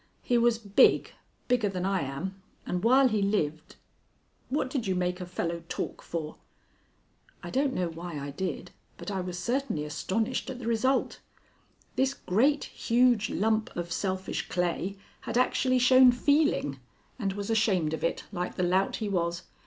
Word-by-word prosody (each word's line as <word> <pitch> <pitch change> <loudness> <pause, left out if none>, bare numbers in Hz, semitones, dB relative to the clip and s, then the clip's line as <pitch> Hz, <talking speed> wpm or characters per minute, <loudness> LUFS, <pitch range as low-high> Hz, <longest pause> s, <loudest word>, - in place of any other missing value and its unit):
He 245 - +1
was 235 -1 +4
big 205 -3 +4 0.4
bigger 240 -5 +2
than 185 -1 -3
I 195 -2 +1
am, 165 +9 -5 0.2
and 180 0 -2
while 260 +3 +6
he 215 -4 0
lived 160 -7 -1 0.7
What 280 +1 0
did 255 -5 -3
you 190 - +1
make 180 0 -1
a 180 - -5
fellow 170 -1 -3
talk - - -4
for?" 160 -2 -5 1.1
I - - -6
don't 275 +1 +1
know 180 -1 0
why 165 -1 -6
I 140 0 -5
did, 170 +1 -4 0.3
but - - -6
I 190 -2 -2
was 180 -1 -5
certainly 235 - -1
astonished 215 +11 -2
at 260 - -5
the 245 - -8
result. 245 +4 +1 0.8
This 265 +1 +2
great, 275 +8 +2
huge 240 -2 +2
lump 220 +1 +1
of 175 0 -4
selfish 190 0 -2
clay 180 +2 -1 0.2
had - - -3
actually 255 0 +2
shown 255 0 +7
feeling 265 - +1 0.4
and 195 -4 -1
was 205 +2 -4
ashamed 195 -8 +2
of 160 - -4
it, 165 - -1
like 180 -2 -3
the 180 - -1
lout 185 +2 +2
he 215 - -3
was. 170 -2 -1
195 Hz, 165 wpm, -28 LUFS, 175-245 Hz, 1.1 s, shown